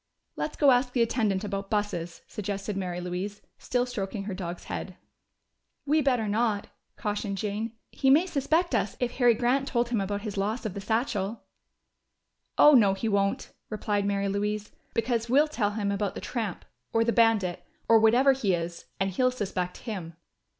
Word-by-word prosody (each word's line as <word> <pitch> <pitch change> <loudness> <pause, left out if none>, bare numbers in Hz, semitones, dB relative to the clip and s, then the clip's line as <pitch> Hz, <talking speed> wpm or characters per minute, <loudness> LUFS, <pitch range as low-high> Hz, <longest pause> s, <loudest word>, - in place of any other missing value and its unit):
"Let's 305 - -3
go 285 -3 +6
ask 250 0 +2
the 240 - +4
attendant 220 -4 0
about 195 -1 -4
buses," 175 -6 -2
suggested 200 0 -4
Mary 180 -2 -3
Louise, 180 +3 -4 0.2
still 245 0 0
stroking 210 -4 -4
her 200 0 -4
dog's 180 -2 -5
head. 185 - -5 0.9
"We 305 +2 +3
better 250 -6 +1
not!" 210 -1 0 0.3
cautioned 205 -2 -3
Jane. 215 +3 -3 0.2
"He 270 - +1
may 305 +7 +6
suspect 325 +1 +1
us, 210 -3 0
if 245 -1 0
Harry 245 -3 +5
Grant 255 +4 +1
told 240 -1 0
him 230 -4 +1
about 200 +1 -2
his 210 -2 -5
loss 215 +5 -1
of 210 - -2
the 200 - -5
satchel." 220 -1 -1 1.1
"Oh 300 - +8
no, 205 -7 +6
he 210 +4 -2
won't," 200 -1 0 0.2
replied 205 -2 -1
Mary 200 0 0
Louise. 210 +1 -2 0.2
"Because 230 0 0
we'll 285 +5 +5
tell 230 -9 0
him 205 -2 -1
about 200 0 -1
the - - -4
tramp, 220 -7 -4 0.3
or 225 - +3
the 235 0 +1
bandit, 205 -7 +3 0.2
or 225 -1 +7
whatever 240 +5 +5
he 220 -9 +1
is 170 0 -5
and 195 0 +1
he'll 255 +7 +2
suspect 190 -7 -4
him." 180 -8 -5
210 Hz, 175 wpm, -28 LUFS, 195-240 Hz, 1.1 s, Oh